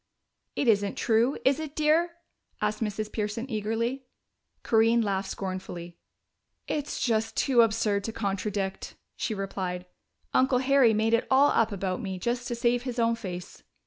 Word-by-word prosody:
"It 275 Hz, -, 0 dB
isn't 205 Hz, -3 st, +3 dB
true, 235 Hz, +4 st, +2 dB
is 270 Hz, +2 st, +4 dB
it, 310 Hz, -2 st, -6 dB
dear?" 320 Hz, +3 st, +2 dB, 0.5 s
asked 210 Hz, +1 st, -1 dB
Mrs. 215 Hz, 0 st, -2 dB
Pearson 215 Hz, +3 st, -3 dB
eagerly. 230 Hz, +5 st, -2 dB, 0.6 s
Corinne 225 Hz, +1 st, +4 dB
laughed 195 Hz, -2 st, -1 dB
scornfully. 180 Hz, -3 st, -6 dB, 0.7 s
"It's 295 Hz, -1 st, -3 dB
just 225 Hz, -2 st, 0 dB
too 255 Hz, -4 st, +4 dB
absurd 215 Hz, -3 st, +1 dB
to 225 Hz, -, -2 dB
contradict," 200 Hz, -2 st, -3 dB, 0.2 s
she 220 Hz, -, -2 dB
replied. 185 Hz, -2 st, -4 dB, 0.5 s
"Uncle 255 Hz, 0 st, +4 dB
Harry 260 Hz, -3 st, +4 dB
made 220 Hz, +1 st, +1 dB
it 230 Hz, -, +2 dB
all 275 Hz, +2 st, +5 dB
up 225 Hz, -1 st, +2 dB
about 190 Hz, -2 st, -2 dB
me 190 Hz, -1 st, -4 dB
just 240 Hz, +5 st, -2 dB
to 240 Hz, -, -2 dB
save 240 Hz, 0 st, +1 dB
his 250 Hz, -1 st, -5 dB
own 230 Hz, -1 st, +3 dB
face." 180 Hz, -6 st, -7 dB
225 Hz, 150 wpm, -27 LUFS, 200-245 Hz, 0.7 s, all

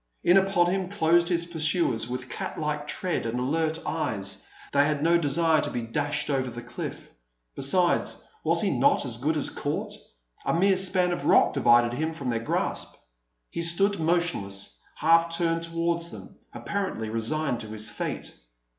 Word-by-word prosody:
In 175 Hz, -, +5 dB
upon 190 Hz, -2 st, +3 dB
him 190 Hz, -1 st, -1 dB
closed 170 Hz, -2 st, +3 dB
his 170 Hz, -1 st, +1 dB
pursuers 155 Hz, -8 st, +1 dB
with 125 Hz, +1 st, -4 dB
cat -, -, -5 dB
like 150 Hz, -1 st, -2 dB
tread 180 Hz, -, -2 dB
and 120 Hz, +2 st, -2 dB
alert 160 Hz, +5 st, 0 dB
eyes. 115 Hz, -12 st, -3 dB, 0.3 s
They 140 Hz, 0 st, +5 dB
had 150 Hz, 0 st, 0 dB
no 170 Hz, +1 st, +4 dB
desire 160 Hz, +1 st, +2 dB
to -, -, 0 dB
be 120 Hz, -, -3 dB
dashed 145 Hz, +5 st, -2 dB
over 130 Hz, -2 st, 0 dB
the 120 Hz, 0 st, -8 dB
cliff. -, -, -7 dB, 0.4 s
Besides, 175 Hz, -, +1 dB, 0.2 s
was -, -, +2 dB
he -, -, +1 dB
not 280 Hz, -, +3 dB
as 120 Hz, -3 st, -3 dB
good 155 Hz, +6 st, 0 dB
as 145 Hz, -, 0 dB
caught? 145 Hz, +1 st, -3 dB, 0.5 s
A -, -, 0 dB
mere 190 Hz, +3 st, +4 dB
span 185 Hz, -1 st, +3 dB
of 160 Hz, -5 st, -3 dB
rock -, -, +5 dB
divided 120 Hz, -3 st, +4 dB
him 160 Hz, +5 st, -2 dB
from 135 Hz, -5 st, -3 dB
their 115 Hz, -, -1 dB
grasp. 115 Hz, -, -2 dB, 0.6 s
He 170 Hz, -, -3 dB
stood 195 Hz, +4 st, +2 dB
motionless, 155 Hz, -, -1 dB, 0.2 s
half 165 Hz, +1 st, +4 dB
turned 165 Hz, -1 st, 0 dB
towards 165 Hz, 0 st, -2 dB
them, -, -, -11 dB, 0.2 s
apparently 190 Hz, -, -3 dB
resigned 120 Hz, +4 st, -1 dB
to 110 Hz, -, -7 dB
his 110 Hz, 0 st, -4 dB
fate. -, -, -4 dB
155 Hz, 170 wpm, -26 LUFS, 125-170 Hz, 0.6 s, In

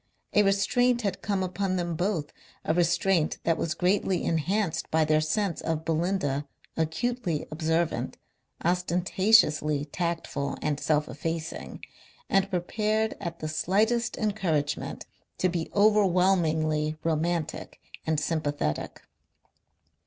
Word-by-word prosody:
A 210 Hz, -, +6 dB
restraint 230 Hz, +5 st, +2 dB
had 200 Hz, -, -2 dB
come 200 Hz, -3 st, 0 dB
upon 185 Hz, +1 st, -1 dB
them 175 Hz, -2 st, -2 dB
both, 175 Hz, -4 st, -1 dB, 0.3 s
a 160 Hz, -, +2 dB
restraint 175 Hz, -1 st, +2 dB
that 165 Hz, -, +2 dB
was 160 Hz, 0 st, -2 dB
greatly 185 Hz, 0 st, +1 dB
enhanced 175 Hz, +3 st, 0 dB
by 160 Hz, 0 st, +3 dB
their 155 Hz, 0 st, +3 dB
sense 170 Hz, +3 st, -1 dB
of 160 Hz, -1 st, -2 dB
Belinda, 160 Hz, -4 st, 0 dB, 0.3 s
acutely 165 Hz, +2 st, -1 dB
observant, 160 Hz, +1 st, -1 dB, 0.5 s
ostentatiously 175 Hz, -3 st, +3 dB
tactful 160 Hz, -3 st, -3 dB
and 150 Hz, -2 st, -1 dB
self 150 Hz, -1 st, +1 dB
effacing, 160 Hz, +3 st, -5 dB, 0.5 s
and 195 Hz, 0 st, +3 dB
prepared 215 Hz, +4 st, 0 dB
at 170 Hz, -3 st, -5 dB
the 155 Hz, -, -2 dB
slightest 215 Hz, +9 st, +1 dB
encouragement 175 Hz, -9 st, -1 dB, 0.3 s
to 185 Hz, -, +2 dB
be 170 Hz, -2 st, -3 dB
overwhelmingly 175 Hz, -7 st, +3 dB
romantic 165 Hz, 0 st, -2 dB, 0.2 s
and 160 Hz, -1 st, 0 dB
sympathetic. 145 Hz, -, -2 dB
170 Hz, 110 wpm, -27 LUFS, 155-195 Hz, 0.5 s, A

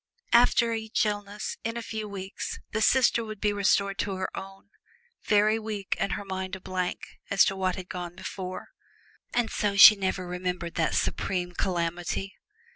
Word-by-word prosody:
After 235 Hz, -1 st, +5 dB
each 220 Hz, +1 st, 0 dB
illness, 205 Hz, 0 st, -4 dB
in 230 Hz, +1 st, -3 dB
a 235 Hz, -, -4 dB
few 220 Hz, -1 st, -5 dB
weeks 195 Hz, 0 st, -5 dB
the 220 Hz, -, -1 dB
sister 235 Hz, 0 st, +4 dB
would 215 Hz, -2 st, -7 dB
be 210 Hz, 0 st, +1 dB
restored 200 Hz, 0 st, +1 dB
to 195 Hz, -2 st, -1 dB
her 185 Hz, 0 st, -4 dB
own, 195 Hz, +1 st, -9 dB, 0.5 s
very 215 Hz, +1 st, +3 dB
weak 215 Hz, -3 st, -3 dB
and 195 Hz, -, 0 dB
her 205 Hz, -, -4 dB
mind 190 Hz, 0 st, -4 dB
a -, -, -8 dB
blank 185 Hz, -1 st, -3 dB, 0.3 s
as 200 Hz, -, +5 dB
to 195 Hz, -, 0 dB
what 185 Hz, -1 st, 0 dB
had 185 Hz, -1 st, -7 dB
gone 175 Hz, -2 st, -6 dB
before. 185 Hz, 0 st, -6 dB, 0.6 s
And 240 Hz, -2 st, 0 dB
so 205 Hz, -1 st, 0 dB
she 210 Hz, +2 st, +11 dB
never 190 Hz, -2 st, -2 dB
remembered 180 Hz, -1 st, -3 dB
that 165 Hz, -2 st, 0 dB
supreme 180 Hz, -2 st, -1 dB
calamity. 175 Hz, +2 st, -2 dB
195 Hz, 170 wpm, -27 LUFS, 185-215 Hz, 0.6 s, she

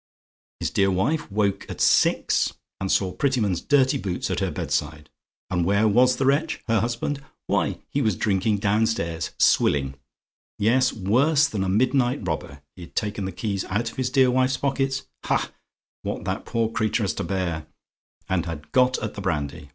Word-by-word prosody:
His -, -, -2 dB
dear 95 Hz, 0 st, +2 dB
wife 115 Hz, -, 0 dB
woke 100 Hz, -1 st, 0 dB
at -, -, -7 dB
six, -, -, +3 dB, 0.3 s
and 95 Hz, -1 st, -2 dB
saw 95 Hz, -2 st, +2 dB
Prettyman's 115 Hz, -, 0 dB
dirty 140 Hz, -1 st, +3 dB
boots 95 Hz, -5 st, -3 dB
at -, -, -1 dB
her -, -, 0 dB
bedside. 75 Hz, 0 st, -3 dB, 0.4 s
And 90 Hz, -2 st, +1 dB
where 100 Hz, +5 st, +3 dB
was 125 Hz, +4 st, +4 dB
the 135 Hz, -, -1 dB
wretch, 145 Hz, +4 st, +1 dB
her 115 Hz, -1 st, +3 dB
husband? 120 Hz, +5 st, -2 dB, 0.2 s
Why, -, -, 0 dB
he 140 Hz, -, -1 dB
was 110 Hz, -6 st, +1 dB
drinking 105 Hz, +2 st, +1 dB
downstairs 100 Hz, -5 st, 0 dB
swilling. 70 Hz, -2 st, +3 dB, 0.6 s
Yes; 125 Hz, +5 st, +3 dB
worse 140 Hz, +10 st, +3 dB
than 100 Hz, -8 st, -2 dB
a 95 Hz, -, -1 dB
midnight 125 Hz, +1 st, +1 dB
robber, 75 Hz, -3 st, -4 dB
he'd 85 Hz, -2 st, -12 dB
taken 105 Hz, -2 st, -2 dB
the 95 Hz, -, -3 dB
keys 100 Hz, -3 st, -3 dB
out 105 Hz, +5 st, -2 dB
of -, -, -18 dB
his 130 Hz, -1 st, 0 dB
dear 130 Hz, -1 st, +4 dB
wife's 130 Hz, +1 st, +2 dB
pockets 135 Hz, -1 st, -1 dB, 0.2 s
ha! -, -, 0 dB, 0.5 s
what -, -, -4 dB
that -, -, -3 dB
poor 115 Hz, -1 st, 0 dB
creature 110 Hz, 0 st, 0 dB
has 95 Hz, -6 st, 0 dB
to -, -, -4 dB
bear! 90 Hz, -5 st, -2 dB, 0.6 s
and 90 Hz, -2 st, 0 dB
had 75 Hz, -2 st, -7 dB
got 130 Hz, 0 st, +3 dB
at -, -, -3 dB
the -, -, -7 dB
brandy. 70 Hz, -1 st, -3 dB
110 Hz, 175 wpm, -24 LUFS, 95-130 Hz, 0.6 s, was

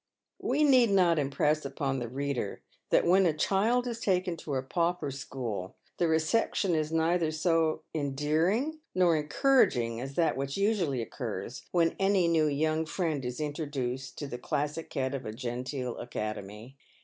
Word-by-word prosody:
We 305 Hz, -, +1 dB
need 255 Hz, -5 st, +6 dB
not 180 Hz, -5 st, +4 dB
impress 150 Hz, +2 st, +1 dB
upon 135 Hz, -1 st, -2 dB
the 120 Hz, -, -4 dB
reader 135 Hz, -5 st, -3 dB, 0.3 s
that -, -, +4 dB
when 185 Hz, +2 st, +5 dB
a 155 Hz, -2 st, 0 dB
child 220 Hz, +9 st, +2 dB
is 235 Hz, -2 st, -4 dB
taken 185 Hz, -4 st, +1 dB
to 145 Hz, -3 st, -4 dB
a 130 Hz, -, -1 dB
pauper 170 Hz, 0 st, -1 dB
school, 125 Hz, -8 st, -5 dB, 0.2 s
the 175 Hz, -, +3 dB
reception 165 Hz, +4 st, +1 dB
is 155 Hz, -1 st, 0 dB
neither 165 Hz, 0 st, +2 dB
so 160 Hz, 0 st, +1 dB
endearing 160 Hz, -, 0 dB, 0.2 s
nor 180 Hz, -3 st, +4 dB
en 150 Hz, -1 st, -2 dB
couraging 125 Hz, -, +3 dB
as 135 Hz, +2 st, -6 dB
that 170 Hz, -2 st, +2 dB
which 135 Hz, +1 st, -3 dB
usually 190 Hz, -, +1 dB
occurs 115 Hz, -2 st, -6 dB
when 170 Hz, -2 st, +2 dB
any 195 Hz, -2 st, +3 dB
new 160 Hz, -2 st, +3 dB
"young 155 Hz, +2 st, 0 dB
friend" 155 Hz, -5 st, -1 dB
is 125 Hz, +2 st, -4 dB
introduced 140 Hz, -4 st, -3 dB
to 145 Hz, -, -4 dB
the 125 Hz, -3 st, -6 dB
classic 150 Hz, +5 st, -3 dB
head 130 Hz, 0 st, -1 dB
of 135 Hz, -1 st, -4 dB
a 110 Hz, -, -5 dB
genteel 125 Hz, +1 st, -4 dB
academy. 110 Hz, +1 st, -6 dB
155 Hz, 160 wpm, -29 LUFS, 130-175 Hz, 0.3 s, need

